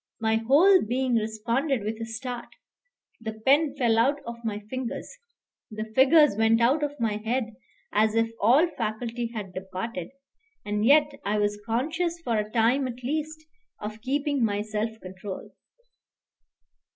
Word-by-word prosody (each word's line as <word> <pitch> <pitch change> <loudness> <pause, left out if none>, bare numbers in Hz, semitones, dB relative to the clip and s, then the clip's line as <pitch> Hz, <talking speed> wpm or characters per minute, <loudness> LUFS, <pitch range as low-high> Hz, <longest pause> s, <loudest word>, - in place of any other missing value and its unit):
My 220 0 +2
whole 310 - +5
being 250 +3 -1
responded 230 +4 0
with 220 +2 -4
a 225 - -4
start. 240 +2 -5 0.7
The 220 -1 -5
pen 275 +7 +2
fell 235 -4 +3
out 275 +5 +3
of 235 0 -8
my 215 -2 -2
fingers, 255 +5 -5 0.6
the 215 0 -6
figures 280 0 +6
went 225 +1 +3
out 260 +6 +3
of 290 -1 -3
my 220 -3 0
head 225 +1 -2 0.4
as 215 +1 +3
if 225 0 +2
all 260 - +5
faculty 235 -3 -3
had 210 -5 -7
departed; 185 0 -5 0.6
and 210 0 -1
yet 290 +4 +5
I 210 +1 0
was 205 0 0
conscious 325 +9 -1
for 235 -5 0
a 210 0 -3
time 245 +4 +2
at 250 0 -8
least 310 +3 -3 0.3
of 215 +1 -7
keeping 280 +1 0
my 205 -2 0
self 220 +1 -3
control. 190 +1 -8
230 Hz, 150 wpm, -26 LUFS, 215-270 Hz, 0.7 s, figures